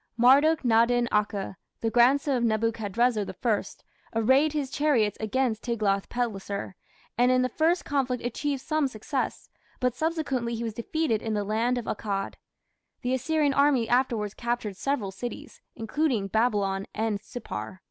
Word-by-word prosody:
Marduk 280 +7 +5
nadin 240 +1 +3
akhe, 205 -2 0 0.3
the 225 - 0
grandson 265 +4 +4
of 240 - 0
Nebuchadrezzar 225 0 +1 0.2
I, 215 -4 +2 0.5
"arrayed 260 +7 +4
his 285 -3 -2
chariots" 275 -9 +2
against 225 0 0
Tiglath 210 -5 0
pileser, 200 -5 -3 0.4
and 245 +1 +5
in 255 0 +3
the 255 - 0
first 330 +5 +1
conflict 265 -3 -1
achieved 275 +2 -2
some 310 -2 +1
success, 260 +3 -3 0.3
but 250 -2 +1
subsequently 275 -5 -1
he 230 - -4
was 225 -2 -3
defeated 235 0 -1
in 220 -2 -2
the 205 - 0
land 225 +4 0
of 240 - -4
Akkad. 200 -2 -3 0.7
The 250 +1 0
Assyrian 290 +2 +1
army 280 -4 +3
afterwards 235 -5 +1
captured 235 -4 -3
several 230 -4 -2
cities, 240 +5 -7
including 225 -3 -1
Babylon 200 -3 +1
and 220 -2 -1
Sippar. 190 - -7
240 Hz, 145 wpm, -27 LUFS, 215-265 Hz, 0.7 s, Marduk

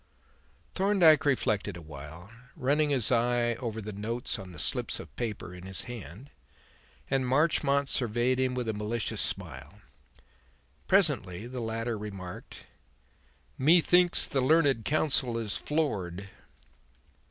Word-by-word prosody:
Thorndyke 185 -7 +4
reflected 105 -8 0
a - - -9
while, 75 +6 -10 0.2
running 145 +3 +1
his 130 -6 +2
eye 120 0 +2
over 115 -3 -4
the 105 0 -6
notes 115 +5 -3
on 95 -1 -9
the 85 - -12
slips - - -2
of - - -11
paper 105 -6 -4
in 90 0 -10
his 95 - -4
hand, 120 - -9 0.8
and 135 -1 +1
Marchmont 140 0 +2
surveyed 125 +1 +1
him 130 -1 +1
with 125 -2 -2
a 110 - 0
malicious 105 +2 -2
smile. 65 +1 -6 1.1
Presently 130 - +2
the 125 0 -6
latter 115 0 -3
remarked: 95 -4 -8 0.9
"Methinks 175 +4 +4
the 135 - -1
learned 135 -5 +3
counsel 135 -6 +1
is 110 -3 -2
floored." 100 - -2
120 Hz, 125 wpm, -29 LUFS, 100-140 Hz, 1.1 s, Thorndyke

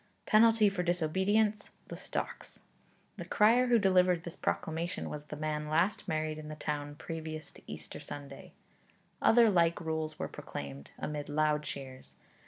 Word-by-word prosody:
Penalty 225 0 +6
for 195 -2 0
disobedience: 190 +5 +1 0.2
the - - -5
stocks. - - -5 0.6
The - - -5
crier 235 +4 +4
who 240 -1 +5
delivered 185 -4 +4
this 170 - -6
proclamation 160 - -2
was 150 0 -6
the 150 - -7
man 150 0 -2
last 170 +7 +1
married 155 -2 -1
in 155 0 -8
the 155 - -5
town 145 -1 -3
previous 160 -1 -6
to - - -16
Easter - - -8
Sunday. 145 -1 -9 0.7
Other 235 0 +6
like 170 -2 +3
rules 160 -1 -3
were - - -3
proclaimed, 70 0 -7
amid 150 -1 -4
loud 150 0 +2
cheers. 135 -3 -8
160 Hz, 150 wpm, -32 LUFS, 150-190 Hz, 0.7 s, Penalty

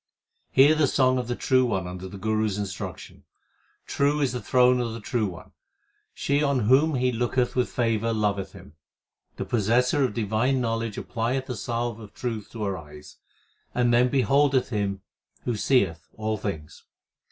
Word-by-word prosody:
Hear 140 +4 +6
the 155 -2 +3
song 130 -1 +2
of 125 - -4
the 120 - -2
True 130 +1 +2
One 95 -7 -1
under 90 +1 -7
the 100 - -9
Guru 110 +2 0
s 100 -1 -3
instruction. 95 -4 -6 0.6
True 145 +1 +1
is 140 -4 +1
the 125 -1 -4
throne 125 0 +4
of 120 -2 -2
the 115 - -6
True 110 0 -1
One; 90 -3 -10 0.6
she 140 +1 0
on 140 -3 +1
whom 135 +8 +4
He 125 0 +1
looketh 120 +1 0
with 125 -1 +1
favour 115 -2 0
loveth 100 -3 -1
Him. 70 - -13 0.6
The - - -4
possessor 120 +6 +2
of 125 -5 -1
divine 115 +4 +1
knowledge 115 -2 -2
applieth 125 +3 -2
the 125 - -5
salve 115 +1 -3
of 105 -2 -12
truth 115 -4 -4
to 110 -2 -4
her 100 -2 -2
eyes, 75 -1 -13 0.6
and 120 -1 +2
then 125 +1 +4
beholdeth 135 +1 +2
Him 100 -4 -2 0.4
who 120 - -1
seeth 100 - +1
all 110 +1 -2
things. 80 -7 -6
115 Hz, 175 wpm, -25 LUFS, 105-130 Hz, 0.6 s, Hear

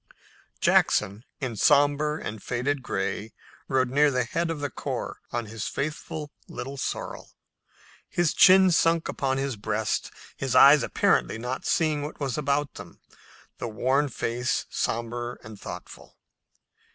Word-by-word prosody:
Jackson, 105 +2 +2 0.2
in 125 -4 -3
somber 145 +4 +3
and 110 -8 -6
faded 130 +5 -1
gray, 105 -1 -3 0.3
rode 130 -2 +1
near 145 +2 +4
the 130 -2 +1
head 165 +8 -2
of 165 -2 -3
the 145 -1 -3
corps - - -4
on 120 -1 -2
his 105 -1 -5
faithful 150 0 -4 0.2
Little 135 +2 -6
Sorrel, 135 - -5 0.8
his 175 -3 +1
chin 190 0 +7
sunk 165 0 +3
upon 135 -1 -1
his 135 -2 -2
breast, 105 +1 -1 0.3
his 130 -1 -2
eyes 140 +3 +8
apparently - - +1
not 125 +3 -4
seeing 155 -3 +1
what 145 +1 -6
was 135 -5 -2
about 145 0 0
them, - - -11 0.6
the - - -3
worn 130 +6 +1
face 120 +1 -1
somber 120 +1 -3
and 110 -2 -11
thoughtful. - - -10
135 Hz, 140 wpm, -26 LUFS, 115-150 Hz, 0.8 s, eyes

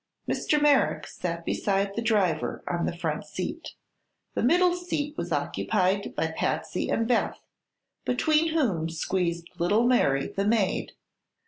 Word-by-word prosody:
Mr. 300 - +1
Merrick 290 -2 +3
sat 170 -1 -5
beside 195 0 0
the 230 - -1
driver 200 -9 +1
on 170 -1 -1
the 170 - -4
front - - -2
seat. - - -6 0.6
The - - -1
middle 355 +7 +4
seat 305 -4 -3
was - - -4
occupied 190 +2 0
by 160 - 0
Patsy 160 +2 -1
and 225 0 +1
Beth, 240 -1 +1 0.6
between 310 +5 +2
whom 185 - +1
squeezed 170 0 -2
little 205 +7 +3
Mary, 140 - +3
the 195 - -2
maid. 215 -4 +1
200 Hz, 135 wpm, -27 LUFS, 170-255 Hz, 0.6 s, middle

